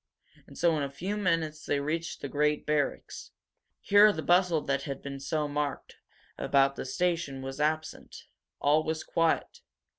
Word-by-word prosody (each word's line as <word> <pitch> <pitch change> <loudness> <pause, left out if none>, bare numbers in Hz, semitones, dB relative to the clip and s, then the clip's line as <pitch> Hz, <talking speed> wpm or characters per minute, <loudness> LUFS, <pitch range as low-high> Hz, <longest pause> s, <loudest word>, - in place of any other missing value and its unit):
And - - -14
so 170 -2 +3
in - - -1
a 140 - -2
few 180 +9 -4
minutes 165 -6 -1
they 145 - 0
reached 160 +4 -3
the - - -4
great 150 +1 0
barracks. 150 -2 -2 0.5
Here 205 +1 +6
the 160 -6 -5
bustle 175 -3 +3
that 140 -1 -1
had 140 -2 -6
been 140 -1 -6
so 150 +2 -1
marked 145 0 -4 0.4
about 140 0 +3
the - - -5
station 165 -3 -1
was 135 +1 -6
absent. 155 +1 -2 0.4
All 150 +2 +3
was 160 0 -3
quiet. 165 -1 0
150 Hz, 160 wpm, -29 LUFS, 140-165 Hz, 0.5 s, Here